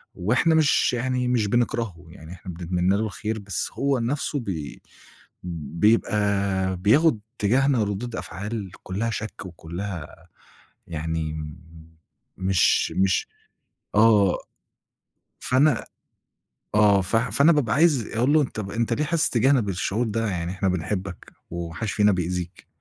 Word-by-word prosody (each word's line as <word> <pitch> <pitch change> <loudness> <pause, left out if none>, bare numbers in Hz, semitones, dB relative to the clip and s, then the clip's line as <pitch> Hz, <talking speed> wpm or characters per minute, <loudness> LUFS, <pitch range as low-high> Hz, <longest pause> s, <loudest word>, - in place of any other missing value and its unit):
وإحنا 125 - +2
مش 155 -5 +3
يعني 125 +1 -1
مش 120 -4 +1
بنكرهه، 115 -5 -1
يعني 80 0 -12
إحنا 95 0 -9
بنتمنى 90 +2 0
له 110 - 0
الخير 110 +1 -4
بس 100 -3 -4
هو 140 -2 0
نفسه 140 +4 -1
بي 85 - -5 0.6
بيبقى 95 +3 +1
بياخد 110 - +3 0.2
تِجاهْنا 125 +2 +2
رُِدود 105 +4 -4
أفعال 100 +1 -5
كلّها 105 +5 -2
شَك 110 -3 -5
وكلّها 85 0 -7 0.6
يعني 80 -1 -3 0.9
مش 95 -1 +2
مش 95 0 +2 0.7
آه 105 -3 +5 1.0
فأنا 130 0 +2 0.9
آه، 105 -2 +5
ف 95 +5 -1
فأنا 140 +7 +4
بابقى 135 -9 +1
عايز 145 -6 +3
أقول 125 +5 +2
له 155 -1 +5
طَب 105 -6 -6
أنت 115 +2 -1
ليه 150 - +1
حاسس 160 +1 +1
تِجاهْنا 130 +3 +3
بالشُعور 100 +3 -1
ده؟ 115 +1 -1
يعني 85 -2 -3
إحنا 95 0 -1
بنحبك 90 +1 -4 0.2
وما 85 -1 -5
حدش 110 +2 -3
فينا 105 -1 +4
بيأذيك، 90 0 -3
105 Hz, 125 wpm, -24 LUFS, 90-120 Hz, 1.0 s, آه